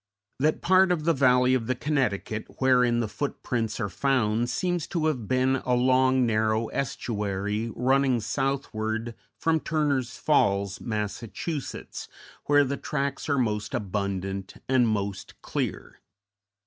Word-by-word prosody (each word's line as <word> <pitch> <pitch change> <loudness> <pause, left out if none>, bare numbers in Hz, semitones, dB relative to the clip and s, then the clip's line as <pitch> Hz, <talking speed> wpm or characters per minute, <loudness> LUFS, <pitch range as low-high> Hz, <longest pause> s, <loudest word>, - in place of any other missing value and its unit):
That 155 +3 +1
part 185 +1 +5
of 165 -4 0
the 165 +1 +3
Valley 125 -2 +4
of 120 -3 0
the 130 - 0
Connecticut 120 -7 -1
wherein 125 -2 +3
the 115 - -1
footprints 115 -3 -3
are 105 - 0
found 120 +1 +1
seems 175 +3 -1
to 165 -4 -1
have 130 -9 -1
been 130 +2 +2
a 125 -1 0
long, 130 +1 +3
narrow 110 0 +1
estuary 105 -3 -2
running 130 0 +2
southward 115 -3 -2 0.2
from 160 -1 +1
Turner's 140 -6 -1
Falls, 100 -9 +1
Mass., 105 -1 -3 1.2
where 145 0 +5
the 140 0 -2
tracks 140 0 -3
are 140 - +2
most 105 -5 -1
abundant 95 -1 -3
and 130 -2 +3
most 100 -2 -3
clear. - - -4
125 Hz, 130 wpm, -26 LUFS, 110-140 Hz, 1.2 s, part